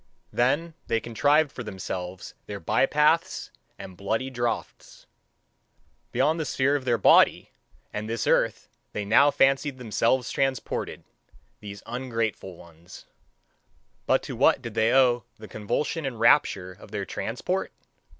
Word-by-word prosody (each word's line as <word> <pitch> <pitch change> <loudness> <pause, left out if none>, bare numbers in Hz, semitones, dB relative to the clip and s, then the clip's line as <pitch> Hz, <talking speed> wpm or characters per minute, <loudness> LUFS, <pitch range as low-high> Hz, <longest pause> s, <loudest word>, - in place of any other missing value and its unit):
Then 150 +7 +1
they 115 - +1
contrived 145 +6 +2
for - - -8
themselves 95 -3 -6
their 100 -1 -6
by 115 +9 +2
paths 150 +3 +1 0.3
and 95 - -10
bloody 110 +8 -2
draughts! 120 -1 -4 1.1
Beyond 145 +7 +1
the 160 - -2
sphere 140 0 +1
of 135 -3 -3
their 120 -2 +2
body 105 - +4 0.4
and 105 +1 -4
this 115 +1 -2
earth - - +1 0.3
they 105 - -3
now 125 +8 +5
fancied 135 0 +2
themselves 125 +1 0
transported, 135 -2 -2 0.6
these 100 -1 -9
ungrateful 115 -6 -3
ones. 85 +1 -15 1.0
But - - +3
to - - -6
what - - +4
did - - -8
they 110 +1 +2
owe 125 -3 +3
the 110 - -11
convulsion 120 +11 -2
and 130 -5 -4
rapture 100 -6 +3
of 90 - -14
their - - -4
transport? - - -3
120 Hz, 135 wpm, -26 LUFS, 105-135 Hz, 1.1 s, now